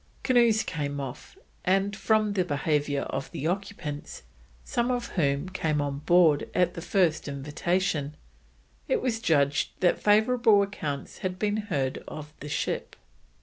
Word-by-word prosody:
Canoes 235 -4 +4
came 145 -4 -3
off, 135 0 -7 0.3
and 195 +2 +1
from 215 0 +2
the 190 -2 +2
behaviour 145 -2 0
of 135 - -4
the 145 - -5
occupants, 175 -5 -4 0.4
some 240 +1 -1
of 245 -1 -1
whom 140 -2 0
came 155 -5 -1
on 140 -1 -2
board 160 -1 +4
at 180 -1 +2
the 170 - -6
first 175 -3 +1
invitation, 150 +2 -1 0.7
it - - +2
was 235 - -1
judged 145 -8 +1
that 175 - +2
favourable 220 0 +4
accounts 150 -8 -5
had 185 -1 -3
been 205 +1 0
heard 145 -12 -2
of 150 -1 -8
the 150 - -7
ship. 145 - -2
175 Hz, 145 wpm, -27 LUFS, 145-205 Hz, 0.7 s, Canoes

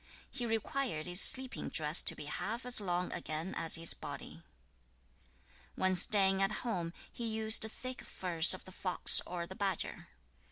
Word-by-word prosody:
6. 270 - -11
He 240 - -4
required 225 - -5
his 180 +1 +5
sleeping 260 -1 +3
dress 155 0 +1
to - - +1
be 150 - -11
half 225 - -7
as 245 -3 +4
long 180 -2 -5
again 165 +1 -7
as 165 - +6
his 165 0 +2
body. - - -11
7. - - -22 1.3
When 185 0 -2
staying 195 0 +3
at 195 +1 0
home, 175 -8 -5 0.2
he 235 - -6
used 220 0 +2
thick 255 +4 -1
furs 175 -1 -1
of - - -15
the 185 - -13
fox 185 -1 +4
or 175 -1 -7
the 185 - -12
badger. 195 -1 -5
190 Hz, 170 wpm, -31 LUFS, 175-220 Hz, 1.3 s, as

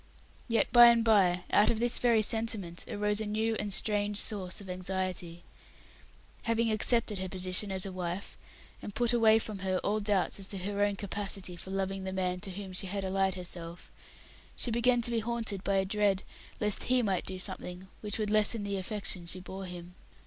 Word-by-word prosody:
Yet 230 -2 +1
by 240 -1 +10
and 235 -1 +5
by 185 -5 +4
out 205 - +5
of 225 - 0
this 240 +1 +4 0.3
sentiment 215 -7 -1
arose 210 +1 +1
a 215 - -3
new 220 +2 0
and 205 -1 -3
strange 205 0 0
source 195 -4 -1
of 200 - -10
anxiety. 180 -2 -4 1.0
Having 230 0 +1
accepted 215 -1 +2
her 190 0 -4
position 185 +2 0
as 190 +1 -1
a 195 - -5
wife, 180 +1 -5 0.5
and 205 - -8
put 240 0 +1
away 225 -2 +5
from 215 -2 -5
her 185 0 -1
all 210 +1 0
doubts 200 -2 0
as 195 - -4
to 200 - -2
her 200 +2 -3
own 205 0 +1
capacity 195 -2 -4
for 180 - -9
loving 195 0 -2
the 190 0 -4
man 180 -1 -1
to 195 - -5
whom 190 0 -7
she 190 +1 -1
had 200 +1 -3
allied 190 0 0
herself, 175 -1 -5 0.6
she 240 - -2
began 240 +1 +2
to 235 - 0
be 230 - +1
haunted 225 -4 -3
by 200 - 0
a 190 0 +2
dread 200 -1 +1 0.4
lest 210 -2 +5
he 255 -1 +2
might 195 -4 -1
do 185 - -4
something 180 0 -4
which 210 -2 -4
would 210 -2 -1
lessen 215 0 +3
the 200 -1 -2
affection 190 -3 -3
she 185 - -2
bore 190 +1 -8
him. 180 -1 -9
200 Hz, 195 wpm, -30 LUFS, 185-215 Hz, 1.0 s, by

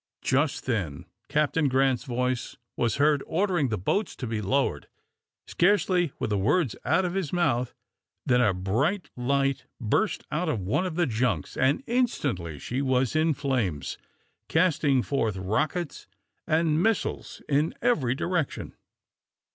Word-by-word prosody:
Just 145 +2 +1
then 95 - -2 0.2
Captain 150 0 +2
Grant's 130 -1 +2
voice 125 -1 -2 0.2
was 115 -3 0
heard 145 0 +3
ordering 175 -5 +1
the 110 - -1
boats 200 - -1
to 125 - -5
be 110 -2 -2
lowered. 135 +8 0 0.6
Scarcely 180 -3 +2
were - - -2
the 105 -2 0
words 130 - +2
out 190 - +2
of 175 - -2
his 185 -7 -2
mouth 130 -9 0 0.5
than 125 0 +3
a 110 -5 +4
bright 115 - -1
light 135 +1 0
burst 130 - 0
out 165 +2 0
of 120 - 0
one 105 - 0
of 170 - -5
the 175 0 +2
junks, 110 - -1
and 135 - +2
instantly 140 - -1
she 120 - -3
was 130 0 +1
in 155 -1 +3
flames, 120 - -2 0.5
casting 150 -6 +2
forth 115 -8 -1
rockets 130 - -2 0.4
and 155 0 +2
missiles 225 +1 -1
of 150 +3 +2
every 140 - +2
description. 170 0 -2
140 Hz, 140 wpm, -27 LUFS, 120-165 Hz, 0.6 s, a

